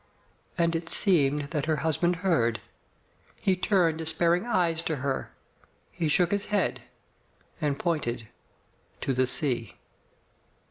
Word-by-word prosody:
And 170 -1 +2
it 165 0 -3
seemed 145 -7 +2
that 150 -2 -2
her 160 - +2
husband 175 +3 +2
heard. 115 - +2 0.8
He 190 - +2
turned 180 -4 +2
despairing 170 +5 +1
eyes 175 -7 +1
on 160 - 0
her 135 -1 -2 0.6
He 165 -2 -2
shook 175 +3 +3
his 205 0 0
head 205 -3 0 0.8
and 145 -2 0
pointed 125 -10 -2 0.7
to 135 - 0
the 130 0 +2
sea. 125 - -1
160 Hz, 125 wpm, -27 LUFS, 140-175 Hz, 0.8 s, shook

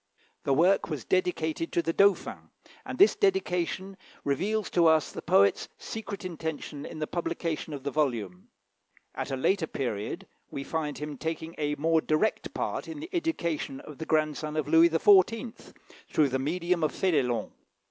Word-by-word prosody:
The 140 - +3
work 180 +6 +3
was 150 -6 -4
dedicated 165 -3 0
to 170 - +2
the 165 - -1
Dauphin, 200 +1 +2 0.4
and - - -5
this 400 - +6
dedication 195 - 0 0.3
reveals 200 +9 -1
to 170 -2 +4
us 160 -1 +3
the - - -7
poet's 100 0 +3
secret 210 -3 -6
intention 160 -4 -5
in - - -8
the 155 - -2
publication 165 -1 -3
of 140 -3 -6
the 140 - -2
volume. 115 -11 -2 0.6
At - - -4
a 135 - -2
later 170 +5 +1
period 110 -6 -3 0.2
we 140 - -5
find 150 -2 -3
him 150 -1 -6
taking 160 0 -4
a 150 -1 0
more 160 +2 +2
direct 155 +9 0
part - - -2
in 315 -2 -7
the 330 +4 -7
education 170 - -2
of 150 - -11
the 160 - -5
grandson 155 0 0
of 150 -2 -1
Louis 165 +2 +6
XIV., 205 +7 +3 0.4
through 150 -3 +3
the 130 +1 -1
medium 170 +4 0
of 155 - +2
Fénélon. 140 -10 0
160 Hz, 165 wpm, -28 LUFS, 145-185 Hz, 0.6 s, this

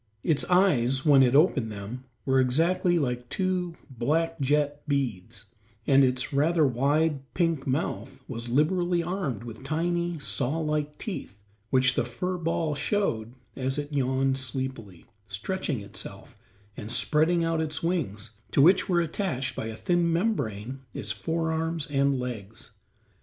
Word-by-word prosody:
Its 155 -3 +2
eyes, 135 -9 +3
when 145 -3 +7
it 130 0 +4
opened 140 -7 +3
them, 105 +6 -7 0.2
were 130 -1 +3
exactly 165 +7 +2
like 125 -5 -2
two 185 -2 -1
black 155 +6 -1
jet 145 +1 +1
beads, 115 -7 -2 0.3
and 135 0 +5
its 125 +1 +1
rather 155 +3 +3
wide, 140 +4 +2 0.2
pink 165 -5 0
mouth 130 - -2
was 120 -1 -5
liberally 175 +6 +2
armed 165 - -3
with 115 +1 -9
tiny, 170 +3 -1
saw 140 0 -1
like 150 -2 -1
teeth, 185 - -6 0.3
which 130 0 +4
the - - +1
fur 180 +10 -3
ball 165 -2 0
showed 135 - -1 0.2
as 135 +1 -2
it 145 0 -4
yawned 135 0 +1
sleepily, 130 -8 -4 0.2
stretching 130 - -2
itself, 100 0 -8 0.4
and 105 +3 -6
spreading 160 +6 +3
out 165 -1 +1
its 155 0 -3
wings, 110 - -2 0.2
to - - 0
which 180 +8 +5
were 175 -2 +3
attached 160 -5 -2
by 110 - -3
a 110 - -5
thin 175 -1 +1
membrance 135 - -1 0.2
its 105 - -4
forearms 160 +7 -1
and 140 -1 +2
legs. 115 -3 -6
140 Hz, 140 wpm, -27 LUFS, 125-165 Hz, 0.4 s, when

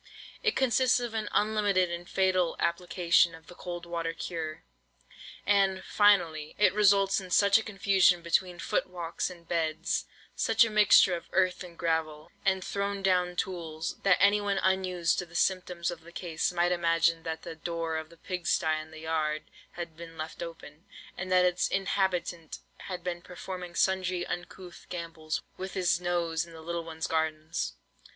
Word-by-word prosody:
It 445 -3 +1
consists 255 -1 +3
of 240 -2 -4
an 220 -1 -2
unlimited 205 -4 +2
and 170 +1 -6
fatal 185 -3 +2
application 170 0 +2
of 160 - -16
the - - -12
cold 175 -1 -7
water 165 -1 -3
cure. 160 -3 -5 0.8
And, 195 -2 +2
finally, 170 -7 +3
it 200 -3 +4
results 200 -1 +4
in 185 - -10
such 200 +3 +5
a - - -5
confusion 195 -4 +3
between 175 +1 +1
foot - - -1
walks 175 -2 -3
and 170 -2 -13
beds—such 160 +7 0
a 225 - -4
mixture 210 -3 +6
of 170 - -9
earth 185 0 +2
and 175 -2 -12
gravel, 160 -2 -2
and 190 -1 +1
thrown 200 +1 -2
down 180 -2 +2
tools—that 170 +1 -1
anyone 205 0 +3
unused 185 -2 +1
to 180 - -4
the 170 - -16
symptoms 180 -2 0
of 170 -1 -8
the 170 +1 -14
case, 170 -2 -2
might 175 0 +1
imagine 165 -1 +2
that 160 -1 -5
the - - -6
door 165 0 -3
of 160 0 -6
the 170 - -17
pigsty 175 -3 0
in 155 - -12
the 155 0 -11
yard 155 -1 -1 0.3
had 170 -2 -6
been 165 0 -11
left 160 +2 -6
open, 165 -1 -9 0.3
and 185 0 -5
that 180 0 +5
its 180 0 +2
inhabitant 180 -4 -1 0.3
had 180 -2 -5
been 175 -1 -3
performing 180 0 -8
sundry 185 -1 +1
uncouth 175 0 -7
gambols 165 -3 -4
with 190 0 -6
his 180 -2 +2
nose 170 -2 0
in 170 -1 -13
the 160 - -10
little 170 +1 -3
ones' 160 -1 -5
gardens. 155 - -2
175 Hz, 165 wpm, -29 LUFS, 165-190 Hz, 0.8 s, mixture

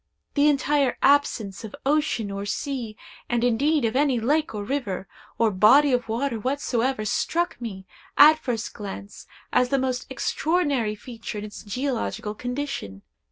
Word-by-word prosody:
The 290 0 +4
entire 280 -1 +1
absence 230 -9 +2
of 220 - -7
ocean 280 -8 +1
or 200 0 -4
sea, 230 +1 -4 0.3
and 240 -1 +1
indeed 275 +4 +2
of 225 - -1
any 275 -3 +2
lake 295 +3 0
or 205 - -3
river, 205 -6 -3 0.3
or 225 -2 +3
body 250 +9 +5
of 245 -2 0
water 235 +1 -1
whatsoever, 255 -2 -1
struck 340 - -1
me, 195 -5 -6 0.3
at 305 +2 +8
first 240 -6 -3
glance, 200 -1 -8 0.3
as 250 - +3
the 275 - +2
most 255 -1 -2
extraordinary 280 -5 0
feature 225 0 -8
in 205 - -5
its 205 - -9
geological 225 -2 -3
condition. 245 - -5
245 Hz, 150 wpm, -25 LUFS, 215-280 Hz, 0.3 s, at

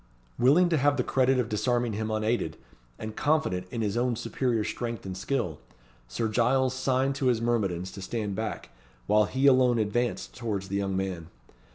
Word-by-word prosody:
Willing 150 +9 +5
to 165 - +2
have 145 +1 +3
the - - +1
credit 130 0 +2
of 125 -3 +1
disarming 120 +2 0
him 110 +1 -2
unaided, 110 +2 -1 0.4
and 110 0 -6
confident 140 -13 0
in 115 +2 -3
his 105 0 -1
own 120 0 +1
superior 120 -1 -1
strength 115 -1 -4
and 95 -1 -5
skill, 95 - -2 0.5
Sir 110 - -2
Giles 125 +4 +2
signed 130 +1 +1
to 135 - 0
his 120 -3 +3
myrmidons 100 -7 -1
to 100 - -9
stand 105 +1 -3
back, 110 +2 -4 0.3
while 105 +6 +4
he 130 +6 -1
alone 130 -3 +5
advanced 115 +3 -1
towards 105 -5 -3
the 100 - -2
young 95 -1 -1
man. 95 -4 -3
115 Hz, 180 wpm, -28 LUFS, 100-130 Hz, 0.5 s, Willing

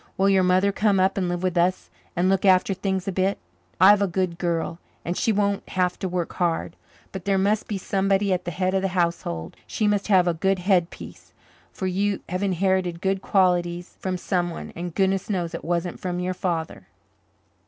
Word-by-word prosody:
Will 195 +1 +3
your 195 -1 +4
mother 185 +2 +3
come 200 -1 +2
up 190 +1 +2
and 185 -3 -1
live 175 0 -3
with 185 -1 0
us 175 - +1 0.2
and 175 +2 +2
look 190 0 +2
after 190 0 +4
things 190 0 -2
a - - 0
bit? 190 +2 0 0.4
I've 200 +2 +7
a 200 - +2
good 180 -1 -2
girl, 170 -1 -2 0.3
and 175 - -2
she 225 - +1
won't 200 -1 0
have 180 -1 0
to 190 - -2
work 175 -1 -3
hard, 170 -1 -1 0.4
but 190 -2 -7
there 195 -1 +2
must 205 +3 +1
be 205 - -2
somebody 195 +1 +1
at 180 0 -1
the - - -4
head 185 +2 -1
of 190 0 +1
a - - +2
household. 125 - -1
She 215 - -1
must 205 -1 +1
have 185 -4 +4
a 175 - +2
good 190 +4 +1
headpiece 180 -2 -2 0.4
for 190 - -5
you 195 +2 0
have 185 +1 -2
inherited 190 -2 0
good 195 +1 -1
qualities 175 -2 +1
from 185 -1 -2
someone, 175 -2 -3
and 175 0 -6
goodness 195 0 +1
knows 175 -4 -2
it 165 - -6
wasn't 175 +1 -2
from 180 -1 -3
your 180 +1 -1
father." 170 -3 -3
185 Hz, 200 wpm, -24 LUFS, 175-195 Hz, 0.4 s, I've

